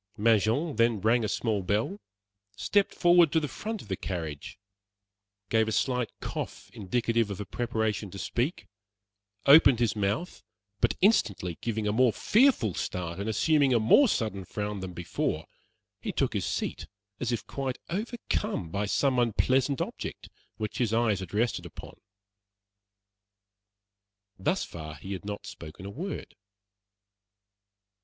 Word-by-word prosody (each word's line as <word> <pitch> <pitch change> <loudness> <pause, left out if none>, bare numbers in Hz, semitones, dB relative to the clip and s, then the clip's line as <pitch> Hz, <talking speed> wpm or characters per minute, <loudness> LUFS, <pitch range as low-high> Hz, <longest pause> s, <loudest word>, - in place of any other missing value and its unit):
Mangin 115 - +2
then 115 -2 +3
rang 115 +4 +3
a - - 0
small 105 0 0
bell, 105 - -1 0.6
stepped 195 - +2
forward 175 -3 +5
to 160 - +3
the 150 - -2
front 220 +7 -5
of - - -15
the 95 - -1
carriage, 80 -7 -5 0.9
gave 110 -1 +3
a - - -1
slight 125 0 0
cough - - -6
indicative 115 +2 0
of 100 -1 -5
a 105 - -4
preparation 110 -1 -2
to 100 - -9
speak, 120 - -2 0.8
opened 140 -3 +8
his 120 -2 +1
mouth, 105 - -2 0.4
but - - +2
instantly 100 - +2
giving 110 -2 -2
a - - +2
more 125 +2 +4
fearful 215 - +3
start 85 0 -4
and 100 +2 -2
assuming 140 +2 +3
a - - +4
more 115 - +6
sudden 110 - -1
frown 105 +2 -4
than 95 -1 -6
before, 85 -1 -2 0.5
he - - -3
took - - 0
his - - -1
seat - - -3 0.3
as 125 - -1
if 120 - -2
quite 135 -2 -3
overcome 210 - -2
by 100 +1 -1
some 130 +4 +2
unpleasant 130 +4 +2
object - - -5 0.3
which 110 -1 -4
his 115 -3 +1
eyes 115 -4 +2
had 95 -3 -7
rested 110 -4 0
upon. 85 - -10 2.5
Thus 175 - +1
far 80 -2 -8
he 95 +4 -7
had 95 - -7
not 105 0 -5
spoken 80 +4 -9
a 100 - -6
word. 180 - -6
110 Hz, 145 wpm, -28 LUFS, 100-135 Hz, 2.5 s, opened